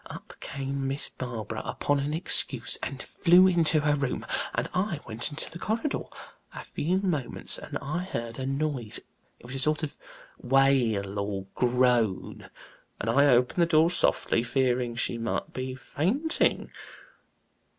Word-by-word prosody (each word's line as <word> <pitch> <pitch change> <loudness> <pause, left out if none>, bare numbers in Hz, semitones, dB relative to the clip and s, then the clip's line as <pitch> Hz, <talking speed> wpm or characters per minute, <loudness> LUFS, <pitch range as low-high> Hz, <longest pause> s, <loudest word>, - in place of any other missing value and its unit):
Up - - -10
came 135 0 -3
Miss 135 +2 -3
Barbara 120 -4 -5
upon 145 0 0
an 140 +2 -2
excuse 160 +3 +1
and - - -5
flew 180 +1 +5
into 165 -4 +3
her 145 0 +2
room, 140 -3 -2 0.3
and - - 0
I 180 -3 0
went 115 +4 -2
into 145 +1 -5
the 170 - -8
corridor. 230 - -1 0.5
A - - -6
few 175 +5 -1
moments 175 -9 -1
and - - -5
I 175 +6 -2
heard 115 -8 -5
a 130 - -2
noise 135 -5 -2 0.4
it - - -16
was 125 - -8
a 135 - -3
sort 155 +3 +2
of 150 - -4 0.4
wail, 120 -7 +2
or 100 -1 -3
groan 120 -5 +1 0.5
and 115 - 0
I 140 +4 +5
opened 125 +6 +3
the 170 - +4
door 165 +1 +4
softly, 115 - +2
fearing 125 -1 0
she 120 0 -2
might 115 0 -3
be 130 0 -4
fainting. 220 - 0
135 Hz, 150 wpm, -28 LUFS, 120-160 Hz, 0.5 s, flew